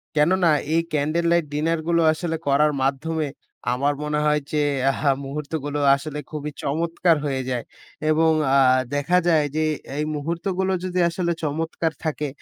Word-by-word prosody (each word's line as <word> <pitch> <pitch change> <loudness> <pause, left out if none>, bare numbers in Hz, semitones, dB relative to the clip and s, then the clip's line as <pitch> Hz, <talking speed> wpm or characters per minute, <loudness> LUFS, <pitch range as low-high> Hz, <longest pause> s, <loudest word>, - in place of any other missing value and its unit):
কেননা 170 +3 +3 0.2
এই 165 - +4
candle 155 +3 0
light 170 -2 +3
ডিনারগুলো 165 +2 +1
আসলে 165 +1 -3
করার 150 +2 +4
মাধ্যমে 150 +3 -1 0.5
আমার 140 +3 +1
মনে 150 0 -1
হয় 150 0 +2
যে 150 -1 +1 0.3
আহা! 140 +1 +1
মুহূর্তগুলো 145 +1 -4 0.2
আসলে 150 +1 -6
খুবই 150 -1 -4
চমৎকার 165 +3 +1
হয়ে 135 -2 -1
যায়। 125 -2 -2 0.5
এবং 160 +1 +4 0.3
আ - - +6 0.4
দেখা 145 +6 +2
যায় 160 -3 +4
যে, 155 - +1 0.2
এ - - -11
এই 150 - 0
মুহূর্তগুলো 180 +5 -2
যদি 185 0 -2
আসলে 170 0 -1
চমৎকার 160 +2 -1
থাকে 150 -1 -1
155 Hz, 150 wpm, -23 LUFS, 145-165 Hz, 0.5 s, আ